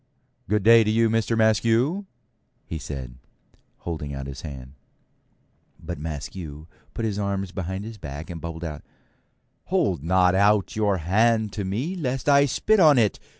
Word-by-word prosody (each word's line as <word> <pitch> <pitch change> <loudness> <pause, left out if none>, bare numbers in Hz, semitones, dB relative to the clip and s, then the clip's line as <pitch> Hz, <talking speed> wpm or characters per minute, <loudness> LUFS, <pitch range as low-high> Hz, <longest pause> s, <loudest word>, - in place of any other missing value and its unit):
'Good 105 0 +1
day 115 +1 +7
to 105 - -1
you, 115 +1 +3
Mister 115 0 +1
Maskew,' 115 - +2 0.7
says 70 -4 -6
he, - - -14 0.7
holding 75 -4 -5
out 70 0 -5
his 70 -1 -7
hand. 65 -4 -9 1.1
But 85 -2 -6
Maskew 75 0 -6 0.3
puts 115 - -2
his 105 -2 -2
arms 100 -2 -2
behind 95 +1 -4
his 110 -1 -9
back 75 +1 -7
and 85 -2 -7
bubbles 85 0 -6
out, 75 -3 -5 0.8
'Hold - - 0
not 90 +1 +3
out 100 +1 +3
your 105 -3 +1
hand 110 +5 +2
to 105 - -3
me 125 - -2
lest 135 -6 -3
I 140 0 +5
spit 215 - +2
on 155 -6 +7
it. 110 -4 +2
100 Hz, 155 wpm, -24 LUFS, 80-115 Hz, 1.1 s, day